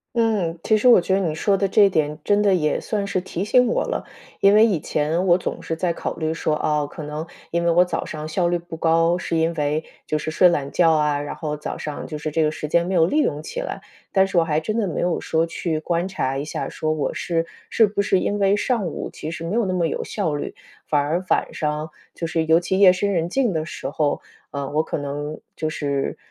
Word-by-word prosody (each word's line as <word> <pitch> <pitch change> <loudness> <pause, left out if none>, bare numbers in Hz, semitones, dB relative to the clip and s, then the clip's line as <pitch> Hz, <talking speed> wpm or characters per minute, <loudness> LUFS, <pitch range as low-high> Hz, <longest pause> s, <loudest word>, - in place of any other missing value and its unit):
嗯， 210 -8 +1
其 220 - +3
实 250 - +2
我 235 - +8
觉 190 - 0
得 195 - +3
你 165 -5 -1
说 195 +5 +2
的 195 0 +1
这 200 0 +5
点 150 -4 0
真 205 0 +3
的 200 -2 +4
也 150 -3 +1
算 205 -2 -2
是 185 -2 -1
提 185 0 -4
醒 250 +3 +4
我 - - +1
了。 - - -3 0.3
因 200 +1 +5
为 215 - +7
以 200 -8 +1
前 160 +6 -1
我 175 0 +6
总 - - -4
是 165 - -3
在 170 +1 0
考 - - -4
虑 160 -1 -1
说， 155 -1 0
啊， 150 -1 0
可 155 - -8
能 150 +2 -5 0.2
因 170 0 0
为 - - +4
我 175 +2 +5
早 180 - -2
上 155 0 -6
效 170 +3 0
率 175 0 +1
不 170 -1 -9
高， 165 +2 +3
是 165 - -2
因 165 +1 +1
为， 150 0 -1 0.2
就 155 - 0
是 155 +1 -3
睡 180 +3 +5
懒 140 -4 -1
觉 165 -2 +4
啊， 150 -2 +2
然 145 - -5
后 150 -2 -3
早 150 - -5
上 150 -1 -5
就 155 - -5
是 150 0 -4
这 160 - +1
个 150 - +2
时 155 -1 -5
间 170 +2 +2
没 190 - -1
有 165 -2 +5
利 300 - +2
用 150 - -1
起 - - -5
来。 - - -5 0.3
但 190 -1 +4
是 190 -2 -2
我 - - +4
还 155 -2 +1
真 215 +8 -3
的 205 - 0
没 165 - -2
有 175 -1 0
说 160 +1 +1
去 165 -1 -2
观 170 +2 -1
察 135 -8 -2
一 140 - -2
下， - - -4
说 155 - -2
我 155 - -2
是 165 -1 -1 0.2
是 225 - +5
不 200 0 -1
是 195 -2 +2
因 205 +2 -1
为 200 0 +4
上 210 -3 0
午 155 - -5
其 155 - -6
实 165 0 -6
没 165 +3 -3
有 235 -2 +2
那 185 - -1
么 175 -2 +1
有 - - -3
效 155 - -2
率， 145 - -4 0.3
反 150 - +2
而 160 +6 0
晚 - - +1
上， 150 +1 -2 0.2
就 170 - -4
是 165 0 0
尤 160 +1 +5
其 190 +2 -1
夜 195 -2 +8
深 200 +2 0
人 170 -1 0
静 245 0 +1
的 155 -1 -1
时 155 - -6
候， 145 0 0 0.3
呃， 140 -1 -4
我 155 - +2
可 160 - -3
能 145 +1 -4 0.2
就 155 - -2
是 140 -3 -2
165 Hz, 280 characters per minute, -22 LUFS, 155-190 Hz, 0.3 s, 我